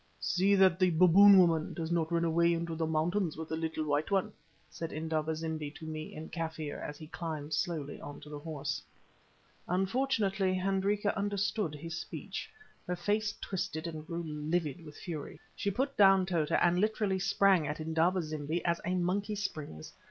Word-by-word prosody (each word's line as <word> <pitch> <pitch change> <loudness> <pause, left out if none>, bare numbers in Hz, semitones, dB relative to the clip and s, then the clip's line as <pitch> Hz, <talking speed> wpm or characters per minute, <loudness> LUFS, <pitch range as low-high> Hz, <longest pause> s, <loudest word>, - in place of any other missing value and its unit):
"See 195 +3 +2
that 190 -2 +5
the 185 -1 +5
'Baboon 185 +4 +8
woman' 165 -4 +3
does 165 0 -3
not 165 -1 0
run 170 0 +2
away 170 +1 +3
into 165 0 -3
the 160 0 -1
mountains 160 +2 0
with 160 0 -6
the 160 - -1
little 160 -1 -2
white 145 +1 0
one," 195 -2 +1 0.3
said 165 -1 -6
Indaba 160 0 -1
zimbi 160 -2 -3
to 160 - -9
me 155 0 -6
in 155 - -7
Kaffir, 160 -3 -4
as 150 - -6
he 155 - -9
climbed 155 -2 -5
slowly 155 -3 -2
on 145 0 -8
to 150 - -11
the 150 -1 -6
horse. 150 -2 -4 0.9
Unfortunately 195 -1 +1
Hendrika 195 +2 0
understood 200 -4 -1
his 165 +3 -6
speech. - - -6 0.4
Her 180 - -1
face 205 +4 0
twisted 170 -4 -3
and 155 -2 -5
grew 170 0 -3
livid 155 +1 -2
with 150 -2 -11
fury. 160 -5 -6 0.2
She 200 - -1
put 265 +7 -1
down 195 -2 +6
Tota 170 -5 +1
and 175 +1 +3
literally 210 -3 +1
sprang 195 -4 +3
at 150 +2 -3
Indaba 165 +3 +1
zimbi 155 +2 -3
as 170 -1 +1
a 180 +1 -1
monkey 195 +4 0
springs. 155 - -5
170 Hz, 175 wpm, -32 LUFS, 155-190 Hz, 0.9 s, Baboon